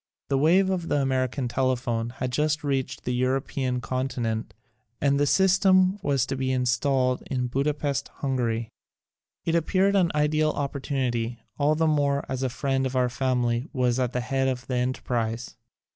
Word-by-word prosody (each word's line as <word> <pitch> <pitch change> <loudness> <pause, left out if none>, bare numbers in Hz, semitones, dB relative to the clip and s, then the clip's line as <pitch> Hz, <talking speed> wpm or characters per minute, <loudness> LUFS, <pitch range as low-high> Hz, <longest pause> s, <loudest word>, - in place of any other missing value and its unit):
The 135 - +2
wave 185 +6 +4
of 175 -3 -2
the 145 - +1
American 130 -1 0
tele 130 +1 +1
phone 120 -2 -2
had 125 +1 -4
just 150 +3 0
reached 135 -2 -2
the 125 - -2
European 130 0 -1
con 130 +2 -1
tinent 115 -4 -2 0.5
and 140 0 +2
the 145 - +3
system 190 +2 +4
was 140 -6 +1
to 135 - -3
be 130 0 -1
installed 130 +1 +1
in 125 -2 -1
Budapest, 140 +2 -1
Hungary. 120 -4 -2 0.8
It 165 - 0
appeared 190 +4 +2
an 180 -4 +3
ideal 155 +1 +2
opportunity, 130 -5 -2 0.2
all 145 +2 +3
the 160 +1 +1
more 145 -2 +1
as 130 -1 -3
a 130 - 0
friend 135 +1 -1
of 130 - -6
our 125 -1 +2
family 125 +1 0
was 125 -2 +1
at 125 -2 0
the 125 - -1
head 135 +1 0
of 125 -1 -2
the 125 - -2
enterprise. 120 -2 -2
130 Hz, 170 wpm, -26 LUFS, 125-145 Hz, 0.8 s, wave